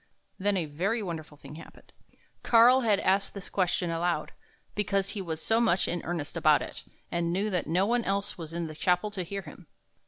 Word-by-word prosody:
Then 200 +1 +1
a 170 - 0
very 190 +10 -1
wonderful 160 -5 -6
thing 150 +1 -11
happened. - - -14 0.5
Karl 245 +3 +6
had 215 -4 +3
asked 195 +2 +1
this 200 -1 -7
question 180 -2 0
aloud, 170 +1 -1 0.4
because 200 -1 0
he 205 - -4
was 160 -4 -4
so 225 +1 +2
much 190 -6 +2
in 175 -1 -2
earnest 165 -4 -4
about - - +4
it, - - -9 0.3
and 170 0 0
knew 200 +4 0
that 180 - -1
no 180 +4 +2
one 235 +2 +1
else 200 0 -1
was 165 -2 -8
in 170 0 -3
the 155 - -6
chapel 180 +6 +1
to 200 -3 -4
hear 195 +3 -5
him. - - -13
185 Hz, 200 wpm, -28 LUFS, 170-205 Hz, 0.5 s, Karl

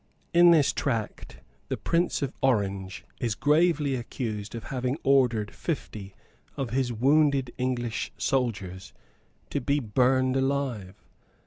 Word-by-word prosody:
In 175 0 +7
this 160 -5 +4
tract 115 -7 -3 0.3
the - - -2
Prince 170 -3 0
of 135 - -3
Orange 100 -7 0
is 115 -3 -1
gravely 150 0 +2
accused 115 -4 -4
of 115 - -6
having 130 +1 -2
ordered 125 -6 +2
fifty 105 - -5 0.4
of 130 -4 -3
his 130 0 0
wounded 135 +1 +2
English 120 -2 -2
soldiers 100 -8 -2 0.6
to - - -1
be 140 +4 +1
burned 130 +2 +2
alive. 135 -8 -1
130 Hz, 120 wpm, -27 LUFS, 110-140 Hz, 0.6 s, In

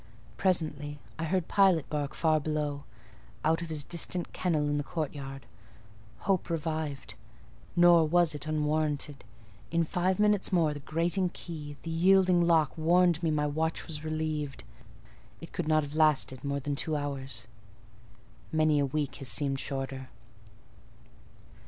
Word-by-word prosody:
Presently 150 -5 -1 0.2
I 165 - -1
heard 180 +1 0
Pilot 190 -6 +4
bark 145 -2 -3
far 155 -2 +2
below, 150 -2 -2 0.6
out 160 +2 +2
of 170 - -5
his 155 -2 -2
distant 175 +2 -2
kennel 155 -5 0
in 145 0 0
the 145 - -1
courtyard: 140 -3 -5 0.8
hope 185 -2 0
revived. 155 -3 -3 0.6
Nor 175 -2 +6
was 170 -1 +3
it 150 +1 -5
unwarranted: 150 -2 -1 0.5
in 170 0 +2
five 180 +3 0
minutes 210 -2 +2
more 165 -5 +3
the 145 - -7
grating 170 +6 0
key, 150 -5 -8
the 165 - -4
yielding 180 +1 +4
lock, 165 -4 +3
warned 175 +1 +4
me 165 - +1
my 150 -1 +1
watch 160 +2 -1
was 150 -2 -5
relieved. 155 -3 -3 0.8
It 165 - -11
could 175 - -3
not 155 -1 +3
have 145 0 -7
lasted 150 -4 +3
more 140 0 -1
than 145 +1 -3
two 155 +2 -1
hours: 135 -5 -4 1.1
many 155 -1 +3
a 140 - +2
week 145 0 -2
has 135 -4 0
seemed 135 +4 +1
shorter. 135 -1 -4
155 Hz, 145 wpm, -29 LUFS, 145-170 Hz, 1.1 s, Nor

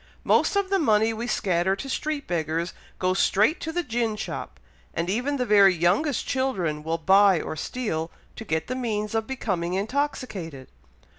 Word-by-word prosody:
Most - - +3
of 400 -1 0
the 390 - +3
money 220 -6 +3
we 230 +2 -4
scatter 190 -3 +1
to 270 - -7
street 295 +1 -2
beggars 165 0 -2 0.2
goes 185 +1 0
straight 215 - +3
to 320 - -4
the 350 +2 -1
gin 230 -5 -1
shop, - - -6 0.4
and 170 +2 -1
even 255 +7 -1
the 250 - 0
very 200 -4 +6
youngest 195 - +1
children 190 -13 -1
will 165 +2 -2
buy 190 +2 +5
or 155 - -5
steal, 165 - -3 0.3
to - - -7
get 160 -6 -1
the 255 - -4
means 220 -4 -2
of 225 -1 -1
becoming 185 -9 -2
intoxicated. 200 - -3
210 Hz, 170 wpm, -25 LUFS, 175-255 Hz, 0.4 s, very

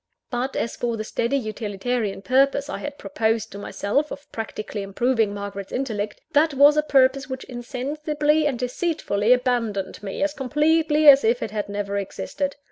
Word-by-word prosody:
But, 250 +2 -2
as 230 - -2
for 235 -2 -2
the 215 - -3
steady, 235 +4 -1
utilitarian 215 -2 -3
purpose 275 +5 +2
I - - -4
had 290 0 -6
proposed 225 -6 -1
to 200 - -8
myself 275 +9 -1
of 285 +1 -9
practically 215 -2 -5
improving 225 +2 +1
Margaret's 200 -1 -6
intellect, 220 -6 -3
that 295 0 +3
was 285 +2 +7
a 300 - +4
purpose 270 -2 +3
which 260 0 -5
insensibly 295 +5 -1
and 270 -4 -1
deceitfully 250 - -1
abandoned 240 -7 +1
me 205 +7 -3
as 295 0 0
completely 300 +3 +2
as 275 -1 +9
if 235 +2 +2
it 215 - -4
had 210 -1 -3
never 200 0 -2
existed. 280 +8 -4
250 Hz, 165 wpm, -23 LUFS, 215-285 Hz, -, as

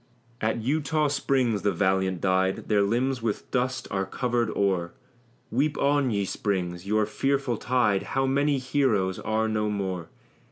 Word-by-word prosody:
At 110 +1 0
Eutaw 150 +3 +1
Springs 130 -6 +1
the 100 - +2
valiant 95 -2 +1
died: 95 0 +1
Their 105 -2 +4
limbs 120 +5 0
with 110 -2 -3
dust 130 +1 -1
are 95 -1 -1
covered 120 +1 0
o'er 95 -4 0 0.6
Weep 145 +5 +1
on, 140 -1 +2
ye 100 -3 0
springs, 90 -2 -2
your 105 +1 +2
tearful 135 +2 0
tide; 115 -6 +1 0.2
How 135 - +3
many 140 +2 +2
heroes 125 -8 +1
are 110 +1 0
no 105 -1 0
more! 95 -5 -3
110 Hz, 150 wpm, -26 LUFS, 100-130 Hz, 0.6 s, Their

